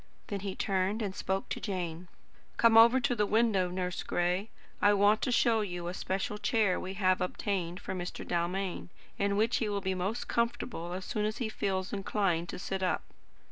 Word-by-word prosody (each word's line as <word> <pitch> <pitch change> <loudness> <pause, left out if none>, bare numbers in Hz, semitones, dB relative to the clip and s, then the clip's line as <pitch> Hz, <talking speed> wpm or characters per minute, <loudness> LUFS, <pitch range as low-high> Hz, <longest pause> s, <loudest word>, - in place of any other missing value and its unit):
Then 200 - -2
he 195 -1 -4
turned 195 +3 0
and 195 -2 -3
spoke 190 0 -2
to - - -3
Jane. 180 -4 -4 0.5
"Come 230 -1 +5
over 235 +3 +8
to 255 -1 +1
the 210 -2 +1
window, 210 -5 +2
Nurse 180 0 -3
Gray. 180 +4 0 0.3
I 205 0 +5
want 205 +2 +4
to 255 - 0
show 230 -2 +3
you 175 -4 -4
a 175 - -3
special 195 +2 -3
chair 210 -4 +2
we 190 +1 -5
have 185 -2 +2
obtained 180 -1 -2
for - - -5
Mr. 180 -1 -5
Dalmain, 180 +2 -2 0.3
in 200 0 +1
which 225 +3 +2
he 220 - -1
will 200 -1 -1
be 190 -1 -1
most 190 +6 -2
comfortable 230 -6 -1
as 185 0 -5
soon 210 -1 -1
as 215 0 -2
he 235 -4 -2
feels 190 -3 -2
inclined 195 -4 0
to - - -5
sit 190 0 -3
up. 185 - 0
195 Hz, 195 wpm, -31 LUFS, 185-215 Hz, 0.5 s, over